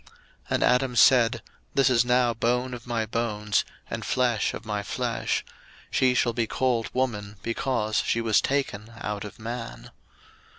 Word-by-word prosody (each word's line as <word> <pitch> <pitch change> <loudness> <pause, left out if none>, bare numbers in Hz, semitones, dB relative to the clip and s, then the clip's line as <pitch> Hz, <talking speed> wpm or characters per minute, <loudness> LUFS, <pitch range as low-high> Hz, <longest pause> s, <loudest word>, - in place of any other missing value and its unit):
01:002:023 - - -22 0.4
And - - +1
Adam 125 0 +2
said, 120 -1 +5 0.3
This 135 -2 +4
is 120 -2 +4
now 125 -1 +3
bone 125 +3 0
of 125 0 -8
my 115 -2 -1
bones, 105 -2 0 0.2
and - - -5
flesh 120 -4 +1
of 115 - -9
my 105 -1 -2
flesh: - - -2 0.5
she 130 -1 +3
shall 120 -1 +2
be 115 -1 0
called 120 -3 0
Woman, 105 -5 -2
because 115 -2 -1
she 115 - 0
was 115 -3 +3
taken 115 -6 -2
out 105 -1 -4
of 105 - -9
Man. 115 +1 -7
115 Hz, 160 wpm, -26 LUFS, 110-125 Hz, 0.5 s, said